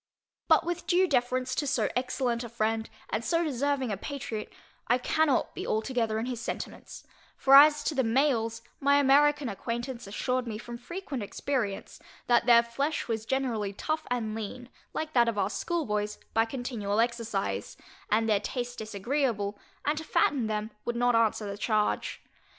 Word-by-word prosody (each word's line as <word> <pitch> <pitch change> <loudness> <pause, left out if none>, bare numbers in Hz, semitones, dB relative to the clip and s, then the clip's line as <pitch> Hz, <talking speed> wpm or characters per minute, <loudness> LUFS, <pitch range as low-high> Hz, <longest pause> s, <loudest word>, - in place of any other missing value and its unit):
But - - +5
with 345 0 -3
due 370 +1 +4
deference 255 -1 +1
to 290 - -1
so 230 -6 +1
excellent 250 -1 -1
a 235 - -6
friend, 220 0 -1 0.2
and 220 - -1
so 335 +8 +1
deserving 280 -3 0
a 200 - -2
patriot, 230 -3 -5 0.4
I 245 - +4
cannot 290 +2 +1
be - - -5
altogether 220 -1 0
in 225 - -1
his 245 -2 -4
sentiments; - - -6 0.3
for 270 - +3
as 295 +2 +8
to - - 0
the 265 -2 +1
males, 230 -2 +1 0.2
my 280 0 +4
American 285 0 +4
acquaintance 235 +3 -4
assured 250 +5 -1
me 215 -2 -4
from 240 +1 -8
frequent 300 -1 -5
experience, 210 -1 -3 0.3
that 240 0 +3
their 235 -1 +7
flesh 275 +6 -2
was 225 -1 -3
generally 235 -7 -1
tough 310 +9 -3
and 230 -3 -1
lean, 225 +3 -6 0.2
like 315 0 -4
that 235 -2 +5
of 225 - -3
our 200 0 +1
schoolboys, 210 -13 -2 0.2
by 225 0 +3
continual 230 -4 -2
exercise, 230 -4 -1 0.3
and 225 +2 +2
their 210 -2 +3
taste 245 +3 -4
disagreeable, 215 -1 -1 0.3
and 300 +1 +1
to - - -6
fatten 275 -6 +2
them 215 0 -2
would 240 - -2
not 245 +1 +3
answer 225 -1 +2
the 200 0 -5
charge. 210 -1 0
240 Hz, 165 wpm, -29 LUFS, 220-275 Hz, 0.4 s, as